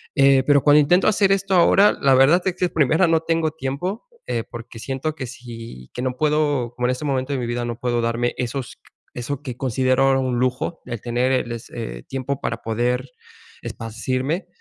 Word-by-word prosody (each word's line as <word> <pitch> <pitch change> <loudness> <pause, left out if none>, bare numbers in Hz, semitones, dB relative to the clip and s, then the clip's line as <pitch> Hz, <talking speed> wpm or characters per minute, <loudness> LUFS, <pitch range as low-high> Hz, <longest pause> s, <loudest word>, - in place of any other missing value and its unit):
Eh, 135 -1 +5
pero 145 -1 +5
cuando 150 0 +6
intento 175 +6 +4
hacer 200 -2 +3
esto 195 0 -1
ahora, 195 +4 +6
la 135 -1 +5
verdad 140 +7 +5
es 185 -2 0
que 185 - 0
es 175 - -3
primera, 160 +3 +3
no 165 -1 +3
tengo 165 -1 0
tiempo, 160 - -4 0.2
eh, 115 -2 -1
porque 115 -1 -9
siento 135 +6 -3
que 130 -5 -5
sí, 115 - -10
que 125 - -5
no 130 0 -1
puedo, 145 -5 +1
como 125 0 -1
en - - +2
este 130 +4 -4
momento 135 0 -1
de 135 - -1
mi 125 - -2
vida 120 0 -2
no 120 -1 -4
puedo 120 -1 0
darme 115 +1 0
esos 125 0 -4
q - - -50 0.3
eso 125 +3 -4
que 125 -5 -6
considero 130 +1 +2
un 125 -2 -1
lujo, 130 +6 -1
el 120 -4 -6
tener, 125 +2 0
el 125 -2 0
es 115 -1 -7
eh, - - -6
tiempo 135 +1 -3
para - - -3
poder 125 +3 -1 0.5
esparcirme. 130 - -3
130 Hz, 205 wpm, -22 LUFS, 120-150 Hz, 0.5 s, cuando